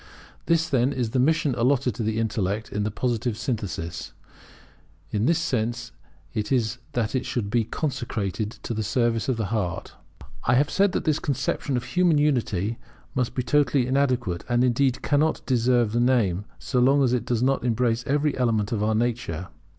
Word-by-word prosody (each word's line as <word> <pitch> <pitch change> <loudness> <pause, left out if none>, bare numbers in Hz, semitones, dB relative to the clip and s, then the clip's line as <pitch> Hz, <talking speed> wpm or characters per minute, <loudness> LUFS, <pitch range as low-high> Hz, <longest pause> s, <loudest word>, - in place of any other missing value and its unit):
This, 165 0 +3
then, 130 -3 +2
is 120 -4 -2
the 130 - +1
mission 155 +1 +2
allotted 125 +1 +2
to - - -5
the 110 0 -1
intellect 110 -2 -1
in 105 - -2
the 105 - 0
Positive 120 0 -1
synthesis; 95 - -4 1.0
in 105 +3 +1
this 165 - +3
sense 120 -5 -2 0.4
it 105 +2 -3
is 120 -2 +1
that 115 -3 -1
it 130 -1 0
should 105 -5 -3
be 115 -1 +2
consecrated 115 - -3
to - - -3
the 110 - -2
service 115 +1 0
of 125 - +1
the 110 -3 -3
heart. 90 -6 -2 0.5
I 125 - +4
have 145 +3 +2
said 195 -1 +3
that - - -2
our 155 - +5
conception 140 -1 -1
of 120 - -3
human 175 +3 +2
unity 115 -8 0 0.3
must 125 -2 -1
be 125 - 0
totally 145 -2 +2
inadequate, 125 -9 0
and, 120 0 +3
indeed, 125 +1 +1
cannot 155 +2 +1
deserve 120 -3 +2
the 120 - 0
name, 110 -7 +2
so 125 - -1
long 135 +3 +4
as 125 -2 +2
it 125 -3 +1
does 120 -1 0
not 135 -1 +1
embrace 120 0 +1
every 145 +1 +1
element 110 -5 +1
of 110 -3 -1
our 110 +1 +1
nature. 110 -7 -2
120 Hz, 180 wpm, -25 LUFS, 110-135 Hz, 1.0 s, our